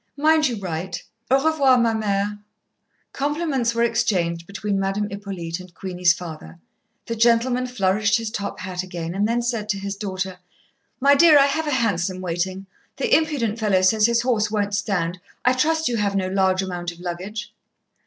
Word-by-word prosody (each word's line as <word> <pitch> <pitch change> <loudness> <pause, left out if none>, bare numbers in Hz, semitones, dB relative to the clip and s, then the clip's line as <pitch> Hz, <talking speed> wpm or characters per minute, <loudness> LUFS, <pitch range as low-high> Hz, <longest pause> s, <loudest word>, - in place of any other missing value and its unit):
Mind 310 +1 +4
you 245 - -2
write. 180 -2 -4 0.3
Au 265 - +5
revoir, 280 -5 +4
ma 235 -2 +2
mère." 205 -1 -1 0.7
Compliments 280 -5 -1
were 235 - +2
exchanged 185 -8 0
between 200 0 -2
Madame 195 +2 -1
Hippolyte 190 -4 -5
and 180 -1 -13
Queenie's 180 -2 +1
father, 160 - -7 0.5
the 230 - -3
gentleman 240 +2 +2
flourished 210 -2 +1
his 225 -2 -4
top 200 -3 -4
hat 185 -1 -4
again, 175 -2 -5
and 200 +2 +1
then 235 +1 0
said 230 -3 -2
to 205 - 0
his 200 0 -4
daughter: 190 -2 -4 0.6
"My 280 +2 +5
dear, 305 +1 +7
I 275 - +6
have 315 +3 -1
a - - 0
hansom 195 -8 0
waiting; 185 +2 -3 0.3
the 475 - +3
impudent 275 -9 0
fellow 200 -4 +2
says 215 +3 +4
his 235 0 +1
horse 225 -4 +1
won't 205 -1 -1
stand. 190 -4 -1 0.3
I 250 - +5
trust 320 +5 +1
you 240 -1 0
have 200 -2 0
no 185 -1 0
large 190 0 +2
amount 175 -2 -4
of 170 - -15
luggage." 185 +5 -6
205 Hz, 175 wpm, -22 LUFS, 185-240 Hz, 0.7 s, dear